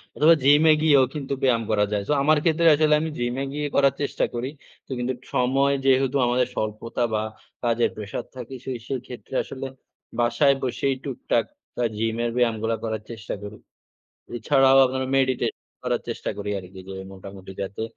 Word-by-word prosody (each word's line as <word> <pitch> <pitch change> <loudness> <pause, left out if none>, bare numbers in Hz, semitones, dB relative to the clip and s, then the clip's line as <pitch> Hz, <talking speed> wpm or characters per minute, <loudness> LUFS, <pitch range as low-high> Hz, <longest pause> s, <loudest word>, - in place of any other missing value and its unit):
অথবা 155 +3 +6
জিমে 155 +2 +7
গিয়েও 145 -4 +6
কিন্তু 140 -2 -4
ব্যায়াম 120 -3 +3
করা 105 -1 +3
যায়। 100 -1 0
সো - - +4
আমার 155 +1 +4
ক্ষেত্রে 165 0 +2
আসলে 150 0 +3
আমি 160 - -2
জিমে 120 +2 -1
গিয়ে 150 0 -2
করার 140 -1 +4
চেষ্টা 145 - 0
করি। 120 +2 -3 0.4
তো - - -12
কিন্তু 125 +1 -1 0.2
সময় 135 +3 +2
যেহেতু 135 +1 +3
আমাদের 125 0 +2
স্বল্পতা 110 +2 -3
বা 110 0 +1 0.4
কাজের 120 0 +2
প্রেশার 105 -1 -5
থাকে 125 +1 -8
সেই, 130 -2 -3
সেই 135 -2 -2
ক্ষেত্রে 125 +1 -10
আসলে 135 0 -7 0.5
বাসায় 130 +4 +3
বসেই 130 +2 0
টুকটাক 120 -4 -1 0.3
তা 125 - -1
জিমের 115 +2 0
ব্যায়ামগুলা 115 -2 +1
করার 110 -2 -2
চেষ্টা 110 -4 -6
করি। 105 +1 -7 0.8
এছাড়াও 135 +3 +4
আপনার 130 +1 -2
মেডিটে 130 -2 +2 0.4
করার 125 -1 0
চেষ্টা 115 - -3
করি 100 0 -3
আরকি 95 0 -10
যে 95 - -6 0.2
মোটামুটি 95 0 -10
যাতে 100 +3 -5
125 Hz, 165 wpm, -24 LUFS, 115-135 Hz, 0.8 s, জিমে